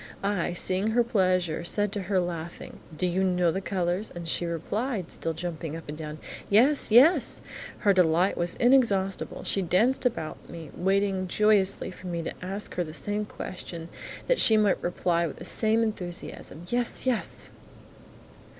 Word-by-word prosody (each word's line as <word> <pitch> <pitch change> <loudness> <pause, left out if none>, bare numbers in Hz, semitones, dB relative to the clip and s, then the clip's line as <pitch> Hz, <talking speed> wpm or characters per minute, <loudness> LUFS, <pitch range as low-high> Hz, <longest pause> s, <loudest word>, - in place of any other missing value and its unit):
I, 200 -3 0
seeing 185 +3 0
her 240 - +6
pleasure, 185 -7 +1
said 205 +3 -1
to 205 - -3
her, 195 -2 +3
laughing, 170 -1 -5 0.2
"Do 180 - +1
you 180 +2 +1
know 180 -2 +2
the 190 - -3
colours?" 185 +1 -1
and 170 -1 -6
she 170 +1 -1
replied, 195 - -3
still 165 - -2
jumping 160 -2 -5
up 165 - -9
and 150 - -5
down, 155 -1 -7 0.3
"Yes! 255 +8 +4
YES!" 260 +11 +5 0.4
Her 200 -2 +3
delight 180 +1 +3
was 175 0 -2
inexhaustible; 225 -7 +2
she 195 - +1
danced 205 +9 +2
about 230 -11 -3
me, 165 -3 -9
waiting 195 0 +1
joyously 200 -1 +2
for 185 0 -10
me 170 -1 -3
to - - -4
ask 195 +3 -5
her 180 - -1
the 155 -1 -8
same 210 +2 -2
question, 170 -4 -6 0.4
that - - +2
she 220 - +7
might 210 -3 +2
reply 170 -1 0
with 145 - -7
the - - -9
same 220 +1 +2
enthusiasm, 180 -5 -5
"Yes! 240 +1 -2
Yes!" 250 -4 -2
185 Hz, 165 wpm, -27 LUFS, 170-210 Hz, 0.4 s, she